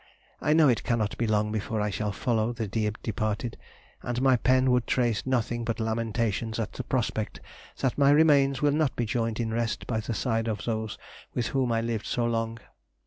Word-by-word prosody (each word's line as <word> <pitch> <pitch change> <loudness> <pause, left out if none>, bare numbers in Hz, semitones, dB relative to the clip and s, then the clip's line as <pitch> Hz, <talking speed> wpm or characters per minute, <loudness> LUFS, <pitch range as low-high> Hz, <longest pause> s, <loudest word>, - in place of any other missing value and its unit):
I 150 - +3
know 155 -1 +6
it 120 -3 +2
cannot 110 -3 0
be 115 - +1
long 105 0 +1
before 110 0 -2
I 105 0 0
shall 105 +2 -2
follow 115 +2 0
the 115 -2 -3
dear 105 +1 0
departed, 110 +2 -2 0.5
and 120 0 -2
my 130 0 +5
pen 130 +1 +3
would 125 -2 +2
trace 120 -4 +1
nothing 120 -2 0
but 115 -1 -2
lamentations 110 0 -1
at 110 -1 -3
the 130 - -5
prospect 115 -4 -2 0.4
that 135 +1 0
my 140 -1 +6
remains 145 -3 +4
will 145 - +4
not 150 -1 +1
be 120 - 0
joined 115 0 -1
in 110 -1 -1
rest 115 -1 -1
by 110 -3 -1
the 110 +1 -3
side 115 -1 0
of 110 -2 -3
those 110 -2 -2 0.4
with 120 - 0
whom 130 -3 0
I 115 0 +1
lived 115 -2 -3
so 120 - 0
long. 115 -1 -1
115 Hz, 200 wpm, -27 LUFS, 110-125 Hz, 0.5 s, know